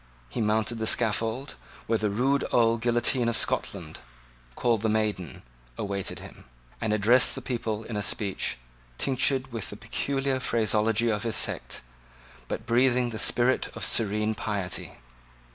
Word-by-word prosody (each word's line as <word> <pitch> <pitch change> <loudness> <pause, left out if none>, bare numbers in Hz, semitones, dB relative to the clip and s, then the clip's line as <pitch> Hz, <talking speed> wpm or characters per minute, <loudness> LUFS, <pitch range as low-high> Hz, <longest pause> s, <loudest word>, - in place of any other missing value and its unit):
He 115 - -3
mounted 110 +2 +1
the 110 - -1
scaffold, 115 +4 +1 0.3
where 115 -1 +1
the 105 - 0
rude 130 +7 +1
old 115 -1 +3
guillotine 120 +1 +2
of 115 - +1
Scotland, - - +1 0.6
called 115 -3 +1
the 110 - +1
Maiden, 105 -6 -2 0.3
awaited 100 -1 -3
him, - - -12 0.4
and 110 -2 0
addressed 110 +4 +4
the - - -4
people 115 -4 -3
in 110 - -6
a 105 - -1
speech, 100 -1 -1 0.4
tinctured 130 0 +1
with 115 -3 -4
the 105 - -8
peculiar 135 +4 -1
phraseology 115 -1 +1
of 105 -1 -1
his 115 -1 -2
sect, - - 0 0.7
but 110 - -4
breathing 125 0 +2
the 110 - -4
spirit 125 +5 +2
of - - -1
serene 105 0 +2
piety. 100 -4 -3
115 Hz, 145 wpm, -27 LUFS, 105-120 Hz, 0.7 s, addressed